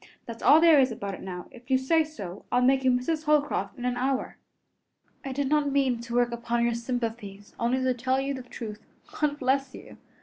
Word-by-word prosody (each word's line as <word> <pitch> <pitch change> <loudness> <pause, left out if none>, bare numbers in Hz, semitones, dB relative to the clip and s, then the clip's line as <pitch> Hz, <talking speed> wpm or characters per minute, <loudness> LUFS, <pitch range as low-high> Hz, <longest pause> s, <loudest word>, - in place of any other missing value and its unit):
That's 230 -1 -8
all 300 - +7
there 325 -3 +6
is 260 -2 +3
about 200 -4 -5
it - - -8
now. 180 -2 -6
If 245 +1 -16
you 260 - +4
say 315 +5 +2
so, 205 - -9
I'll 250 0 +3
make 265 +1 +3
you 260 - +4
Mrs. 280 +6 0
Holcroft 300 -1 +1
in 245 - -5
an 250 -1 -1
hour." 260 +1 -1 0.9
"I 270 - -5
did 280 +1 -1
not 295 0 +1
mean 265 -4 +1
to 235 0 -6
work 245 -1 +2
upon 235 0 -1
your 235 0 +2
sympathies, 230 -4 -5
only 250 +3 +1
to 255 0 +2
tell 255 +2 0
you 275 +1 -2
the 260 - -6
truth. 225 -4 -8 0.4
God 295 -1 +1
bless 265 0 0
you! - - -12
255 Hz, 215 wpm, -27 LUFS, 235-275 Hz, 0.9 s, all